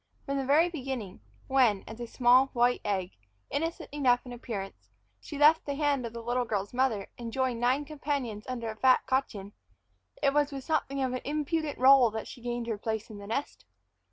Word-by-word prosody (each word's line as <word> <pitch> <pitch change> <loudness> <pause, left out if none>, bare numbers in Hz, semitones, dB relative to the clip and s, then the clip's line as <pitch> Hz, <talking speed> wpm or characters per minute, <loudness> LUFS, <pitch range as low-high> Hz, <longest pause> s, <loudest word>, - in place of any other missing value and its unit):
From 275 -1 -1
the 270 - -2
very 310 +5 +5
beginning, 260 - -5 0.2
when, 245 -7 +3
as 225 +1 -9
a 240 - -5
small 250 +2 +4
white 245 0 +2
egg, 190 -3 -1 0.4
innocent 325 +2 -3
enough 260 -4 +2
in 245 - -8
appearance, 195 - -7 0.3
she 290 - -8
left 305 +3 +6
the 285 - -2
hand 285 -4 0
of 230 - -10
the 235 0 -7
little 245 +2 0
girl's 205 -3 -3
mother 245 -6 +1
and 235 -1 -5
joined 260 -2 -1
nine 255 +4 +1
companions 280 -7 -4
under 235 -3 -3
a - - -9
fat 255 +3 +4
cochin, 210 -7 -2 0.7
it 275 -1 +2
was 295 0 +2
with 270 -1 -6
something 275 -3 -1
of 255 -1 -1
an 255 - -3
impudent 300 +1 -2
roll 260 -1 +7
that 220 0 -5
she 250 - -11
gained 240 0 -3
her 225 -3 -3
place 220 0 -3
in 205 - -9
the 200 - -10
nest. 235 +7 -4
250 Hz, 200 wpm, -29 LUFS, 225-280 Hz, 0.7 s, roll